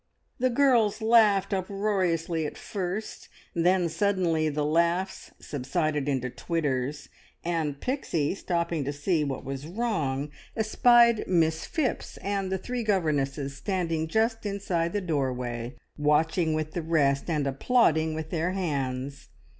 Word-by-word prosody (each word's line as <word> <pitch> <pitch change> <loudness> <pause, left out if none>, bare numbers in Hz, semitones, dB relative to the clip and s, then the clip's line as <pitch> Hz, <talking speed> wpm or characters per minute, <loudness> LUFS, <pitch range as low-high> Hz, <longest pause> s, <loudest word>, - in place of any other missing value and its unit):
The 255 +1 +3
girls 235 -5 +3
laughed 220 -3 +4
uproariously 185 -5 0
at - - -8
first, 195 +2 -5 0.2
then 175 +1 +3
suddenly 170 -4 +1
the 150 0 -1
laughs 170 +4 0
subsided 150 +1 -2
into 130 -3 0
titters, 145 -4 -2 0.4
and 160 -5 -1
Pixie, 180 - -1
stopping 170 -5 -1
to 145 - -2
see 150 +3 0
what 135 -3 -4
was 135 +2 -5
wrong, 160 - -1 0.3
espied 235 +1 +5
Miss 160 -3 +1
Phipps 315 -7 -2
and 195 -1 -2
the 190 - +1
three 245 +5 -4
governesses 145 -9 0
standing 165 -1 -1
just 225 +5 +1
inside 190 -5 -1
the 205 - 0
doorway, 125 -7 -2 0.2
watching 155 +2 +2
with 155 0 -2
the 175 - -3
rest, 150 -3 +1
and 150 -4 0
applauding 160 - +2
with 160 0 -5
their 175 +2 0
hands. 140 -6 -3
165 Hz, 130 wpm, -27 LUFS, 145-200 Hz, 0.4 s, espied